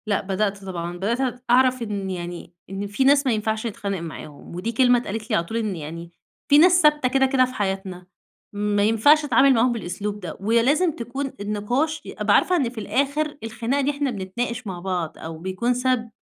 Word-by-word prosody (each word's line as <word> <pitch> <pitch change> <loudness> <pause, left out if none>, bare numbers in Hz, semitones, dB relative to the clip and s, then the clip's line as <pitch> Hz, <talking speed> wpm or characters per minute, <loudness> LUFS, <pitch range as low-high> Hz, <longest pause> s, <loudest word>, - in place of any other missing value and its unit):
لأ 205 -2 +1
بدأت 200 0 -2
طبعًا، 175 -2 -5
بدأت 245 +6 -2
أعرَف 255 +1 +4
إن 205 -4 -3
يعني، 175 -1 -6 0.2
إن 195 +1 -4
في 205 +6 0
ناس 280 +1 +4
ما 260 - +2
ينفَعش 220 +1 -1
نتخانق 200 -3 -4
معاهم 155 -1 -9
ودي 190 +6 -3
كلمة 245 +1 +4
اتقالِت 225 0 -6
لي 215 - +1
على 170 - +1
طول، 225 +7 -4
إن 215 -4 -2
يعني 165 +2 -8 0.4
في 290 - +7
ناس 355 +3 +6
ثابتة 300 -4 +4
كده، 270 +1 +3
كده، 260 -1 +3
في 255 - -8
حياتنا 190 -3 -4 0.5
ما 205 0 0
ينفعش 255 +9 +4
نتعامل 275 -2 +5
معاهم 245 +1 +3
بالأسلوب 210 -1 -4
ده، 175 -5 -7
ولازم 235 - +2
تكون 265 +4 -4
النِّقاش 225 +10 -1
أبقى - - +1
عارفة 365 - +3
إن 275 -9 +1
في 240 - -16
الآخر 285 +7 -1
الخناقة 235 +5 -1
دي 280 +1 +1
إحنا 285 -2 -2
بنتناقش 230 +4 -4
مع 185 -2 -5
بعض 175 -3 -3
أو 160 0 -7
بيكون 190 +8 -1
سبب 250 -1 0
225 Hz, 190 wpm, -23 LUFS, 195-260 Hz, 0.5 s, في